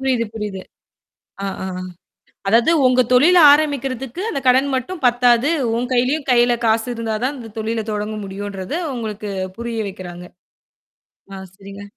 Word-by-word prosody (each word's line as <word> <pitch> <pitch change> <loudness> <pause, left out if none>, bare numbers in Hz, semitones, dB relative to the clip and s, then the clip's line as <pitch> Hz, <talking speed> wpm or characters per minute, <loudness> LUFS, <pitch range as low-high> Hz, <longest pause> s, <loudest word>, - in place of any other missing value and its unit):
புரியுது, 255 -3 0
புரியுது. 210 -3 -5 0.8
ஆ, - - -1 0.2
ஆ - - -3 0.8
அதாவது 230 +9 +4
உங்க 255 0 +4
தொழில் 340 +8 +6
ஆரம்பிக்கறதுக்கு 275 -1 0
அந்தக் 275 - -4
கடன் 260 +3 +4
மட்டும் 310 +8 -4
பத்தாது. 245 +2 +3 0.3
உன் 245 +2 -2
கையிலயும் 265 +4 0
கையில 240 0 +4
காசு 225 +2 +2
இருந்தாதான் 230 +4 -2
இந்தத் 225 -3 -11
தொழில 220 0 -2
தொடங்க 210 +1 -3
முடியுன்றத, 195 +1 -6 0.2
உங்களுக்குப் 205 -5 -5
புரிய 235 -1 -4
வைக்கிறாங்க. 180 -2 -9 1.1
ஆ - - -6 0.2
சரிங்க. 200 0 -11
235 Hz, 130 wpm, -19 LUFS, 210-255 Hz, 1.1 s, தொழில்